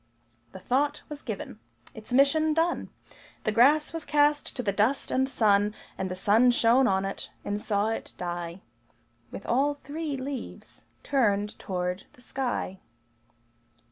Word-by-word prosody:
The - - -9
thought 285 +8 0
was 295 -1 -7
given. 200 - -6 0.3
Its 220 +2 -11
mission 305 +4 +4
done, 330 +2 0 0.5
The 215 - +1
grass 280 +9 +4
was 330 -1 -4
cast 295 0 +2
to 250 - -3
the 205 - +1
dust 215 +8 +1
and 265 +1 +1
sun; 210 -4 +3 0.2
And 190 - -3
the 185 - -3
sun 215 +6 +4
shone 245 +2 +4
on 190 0 +1
it, 195 - -5 0.2
and 205 +1 -2
saw 205 0 +1
it 225 - -4
die 175 0 -5 0.7
With - - -8
all 280 +4 +2
three 290 0 -5
leaves 265 0 -7 0.2
turned 210 -7 +1
toward 180 0 -3
the 245 - -20
sky. 245 -8 -3
245 Hz, 145 wpm, -27 LUFS, 200-285 Hz, 0.7 s, mission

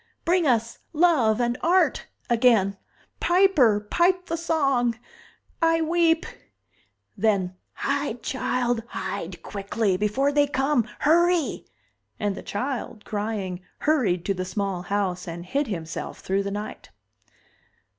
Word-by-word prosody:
Bring 345 -1 +3
us 230 -2 +1
love 295 -10 +3
and 240 0 0
art 365 +3 +2 0.2
again! 225 -5 +3 0.4
Piper, 345 - +4
pipe 355 - +1
the 330 - -2
song! 275 -8 +1 0.6
I 330 0 +4
weep!" 330 0 +2 0.9
Then: 195 -3 +1 0.2
"Hide, 280 -4 -2
child, 245 -2 -1
hide 185 -4 -5
quickly! 200 -1 -1
Before 210 +8 +1
they 290 0 +3
come! 270 -4 +1
Hurry!" 340 0 +2 0.5
And 205 -2 0
the - - -7
child, 230 -1 -4
crying, 205 -4 -3 0.2
hurried 220 - +1
to 200 - +1
the 185 -1 -3
small 190 -1 -2
house 185 -2 -2
and 170 +1 -6
hid 275 +9 -1
himself 165 -6 -5
thru 195 +1 0
the 200 - -3
night. 210 +2 -6
235 Hz, 120 wpm, -25 LUFS, 200-300 Hz, 0.9 s, Piper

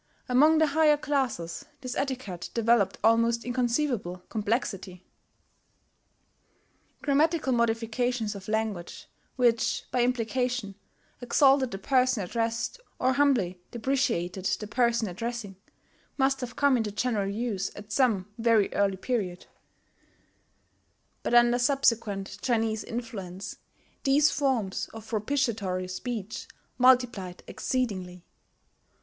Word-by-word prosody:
Among 295 +6 +5
the 315 - +5
higher 300 0 +4
classes 260 - -2 0.2
this 255 -2 -5
etiquette 255 -11 -3
developed 230 -4 +3
almost 230 +1 +3
inconceivable 240 -7 -1
complexity. 200 -4 -2 2.0
Grammatical 300 -1 +2
modifications 230 -1 0
of 195 -2 -10
language, 215 -5 -3 0.3
which, 240 -3 +2
by 250 - +2
implication, 245 -2 0 0.5
exalted 265 +1 +4
the 195 - -5
person 255 +1 +2
addressed 230 - -2 0.2
or 255 +1 +2
humbly 250 -11 +2
depreciated 225 -8 -1
the 210 - -1
person 235 +1 +1
addressing, 225 +1 -5 0.6
must 270 -1 +2
have 245 -1 -5
come 280 -3 +3
into 220 -3 -1
general 210 -2 -1
use 205 -2 -2
at 205 0 -11
some 210 -5 +2
very 225 -3 +3
early 195 -1 +1
period; 190 -5 -3 1.8
but 240 - 0
under 240 0 +5
subsequent 230 -7 +1
Chinese 225 -3 0
influence 205 -6 -6 0.5
these 285 +2 +4
forms 255 -9 -1
of 225 - -9
propitiatory 215 -6 -1
speech 215 +2 -5 0.3
multiplied 245 -8 +3
exceedingly. 185 -8 -3
230 Hz, 105 wpm, -28 LUFS, 200-255 Hz, 2.0 s, Among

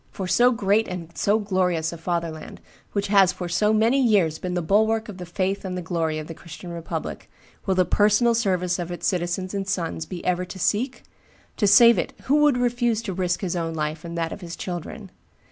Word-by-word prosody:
For 190 - -5
so 245 +6 +4
great 215 -1 +1
and 170 -2 -7
so 205 +2 +2
glorious 180 -6 0
a - - -7
fatherland, 165 -2 -4 0.3
which 200 -1 0
has 195 -3 +5
for 180 - -6
so 195 +5 +2
many 225 +5 +3
years 195 -10 +2
been 180 -1 -3
the 175 - 0
bulwark 220 +5 +2
of 195 -3 -9
the 180 - -7
faith 190 +3 -2
and 185 -1 -4
the - - -3
glory 160 -2 -1
of 155 - -5
the 165 - -7
Christian 175 +2 -10
republic, 170 -1 -6 0.4
will 190 - +2
the 185 -1 +3
personal 210 +5 +3
service 185 -5 0
of 175 0 -4
its 175 - -5
citizens 180 +1 -1
and 200 - -1
its 195 0 -3
sons 165 -2 -3
be 180 -2 -7
ever 180 0 +1
to 185 - -8
seek? 240 +7 -1 0.5
To 205 - +2
save 230 +4 +7
it - - -3
who 285 +3 +2
would 295 -3 +4
refuse 240 -2 0
to 195 - -4
risk 180 -1 -1
his 185 -3 -2
own 165 -1 -2
life 155 0 -3
and 170 0 -6
that 165 -1 -1
of - - -10
his 170 -1 -7
children? 175 -3 -6
185 Hz, 220 wpm, -24 LUFS, 170-210 Hz, 0.5 s, save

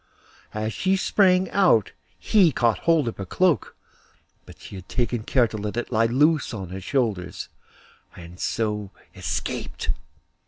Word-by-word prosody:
As 110 +1 -2
she 190 +1 +1
sprang 190 -1 +3
out 175 - +3 0.3
he 190 -7 +4
caught 120 -3 +1
hold 160 -6 +4
of 115 - -4
her 95 - -5
cloak; 175 - +1 0.7
but - - -14
she - - -12
had 95 -1 -10
taken 120 -2 -1
care 120 +2 +2
to 110 - -6
let 105 +2 -4
it 120 - -3
lie 115 0 +3
loose 145 +2 +2
on 95 -4 -6
her 95 +1 -6
shoulders, 95 -6 -2 0.7
and 85 +1 -12
so 105 -4 -2 0.2
escaped. - - -3
115 Hz, 150 wpm, -24 LUFS, 105-155 Hz, 0.7 s, he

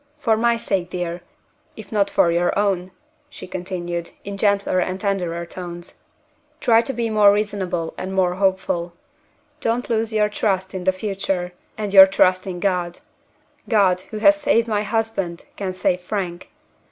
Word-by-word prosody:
For 230 -7 +2
my 235 +1 +2
sake, 190 -5 -2
dear, 175 -1 -4 0.6
if 215 -2 -11
not 205 -2 +2
for 170 - +3
your 175 +2 +1
own," 195 -3 0 0.4
she - - -9
continued, 175 -2 -4
in 200 0 -6
gentler 200 -2 +1
and 185 +1 -2
tenderer 180 -4 -2
tones, 175 0 -8 0.6
"try 230 -1 +4
to 250 - -3
be 235 -3 -2
more 210 -2 +6
reasonable 195 -5 -2
and 185 - -4
more 185 -2 +1
hopeful. 185 -2 0 0.7
Don't 235 +2 -1
lose 225 0 0
your 215 -1 +2
trust 190 -2 -1
in 185 -1 -5
the 190 - +4
future, 185 -2 -3 0.2
and 210 -2 -4
your 190 -1 +11
trust 185 -1 +2
in 180 -2 -4
God. 180 -3 -1 0.7
God, 190 -5 +3
who 215 - -6
has 300 +8 +5
saved 230 -5 +2
my 210 -2 0
husband, 210 -5 -2
can 195 -2 -3
save 185 0 0
Frank. 180 -2 -4
190 Hz, 160 wpm, -21 LUFS, 180-210 Hz, 0.7 s, your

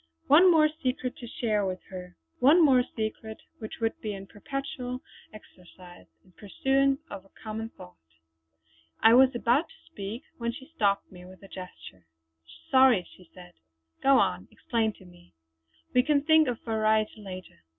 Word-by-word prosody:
One 340 +6 +7
more 315 -3 +5
secret 255 -2 -2
to 240 - -9
share 215 -3 -1
with 185 -1 -3
her; 180 -1 -9 0.2
one 315 +6 +6
more 260 -3 +5
secret 220 0 -4 0.2
which 220 - -8
would 225 -1 -2
be 215 -1 -4
in 195 0 -9
perpetual 255 +3 -6 0.3
exercise, 180 -3 -15 0.2
in 185 - -23
pursuance 270 +8 0
of 195 -2 -7
a 195 - -24
common 220 +1 -5
thought. 90 - -15 1.0
I 225 - +7
was 260 +1 +6
about 245 +6 +1
to - - -21
speak 205 +5 -6 0.2
when 235 0 -2
she 265 +2 -11
stopped 200 -5 0
me 180 -1 -13
with 185 +2 -15
a - - -11
gesture. 180 - -11 0.6
"Sorry!" 260 -8 +5
she 180 -3 -19
said. 175 -1 -14 0.5
"Go 275 0 +5
on; 90 - 0
explain 225 -2 -1
to 190 - -18
me! 175 - -19 0.6
We 250 - +5
can 285 +1 +1
think 315 -1 +5
of 245 -2 -2
variety 220 -1 0
later!" 185 -2 -10
220 Hz, 160 wpm, -27 LUFS, 190-260 Hz, 1.0 s, One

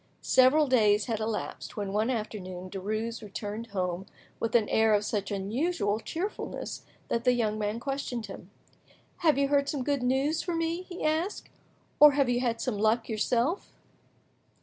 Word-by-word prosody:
Several 260 +4 +5
days 215 -6 +3
had 225 -3 -2
elapsed, 220 0 -4
when 200 -2 -3
one 215 +3 +1
afternoon 185 -6 -4
Derues 215 +4 -3
returned 210 +2 -6
home 185 -2 -3 0.3
with 230 +1 -1
an 220 -3 +4
air 220 -1 +4
of 205 0 0
such 205 -2 -2
unusual 210 - -1
cheerfulness 350 - -5 0.3
that 235 - 0
the 250 - +4
young 215 -3 0
man 210 +2 -1
questioned 265 -3 -3
him. 195 -2 -10 0.7
"Have 310 -5 +3
you 280 0 +2
heard 280 -1 +2
some 280 -4 -2
good 280 -1 0
news 270 +5 +1
for 350 -2 -3
me?" 330 +1 -1
he 365 -1 -8
asked, 320 +6 -1 0.5
"or 295 -1 +9
have 275 -3 +2
you 245 0 +2
had 235 -2 0
some 230 -6 -2
luck 220 +2 +2
yourself?" 240 - 0
230 Hz, 165 wpm, -29 LUFS, 210-280 Hz, 0.7 s, or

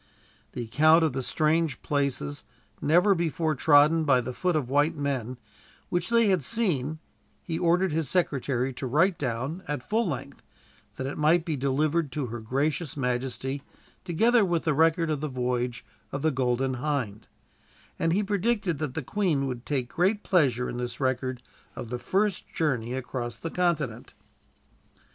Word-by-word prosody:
The 120 - -4
account 155 +8 +5
of 155 -5 +1
the 130 - -2
strange 155 +2 +1
places, 140 - -1 0.4
never 180 +7 +4
before 165 -2 0
trodden 150 +3 +5
by 135 -4 +4
the 125 +1 -4
foot 180 +5 0
of 145 -5 0
white 145 +4 +2
men, 130 -4 -2 0.5
which 175 +2 0
they 230 -2 +4
had 185 -6 +2
seen, 160 - 0 0.5
he 165 -2 -3
ordered 175 +1 +2
his 155 -3 -1
secretary 135 -7 0
to 130 - -4
write 165 +8 +2
down, 135 +6 -3
at 145 -4 -4
full 225 +1 +1
length, 140 -7 -5 0.5
that 130 - -4
it 135 - -4
might 160 +2 +3
be 160 -4 -1
delivered 145 +3 0
to 145 -2 -2
her 120 - -4
gracious 140 +7 -1
majesty, 130 +1 -2 0.4
together 225 +7 +3
with 175 -4 0
the 155 - +1
record 165 +2 +3
of 150 -2 -2
the 155 - -1
voyage 125 -2 -2 0.3
of 140 +1 -4
the 160 - +3
Golden 130 0 0
Hind; 130 -9 -2 0.7
and 165 - +1
he 200 +5 +2
predicted 200 -4 0
that 150 -5 -3
the 160 - -3
Queen 165 -5 0
would 125 -2 -5
take 130 -4 -2
great 200 +4 +1
pleasure 130 -9 +2
in - - -5
this 120 -1 -4
record 130 -1 -1 0.3
of 115 - -7
the 125 0 -3
first 195 - 0
journey 125 -6 -1
across 120 -3 -4
the 165 - -6
continent. 155 -10 -1
145 Hz, 165 wpm, -27 LUFS, 130-170 Hz, 0.7 s, account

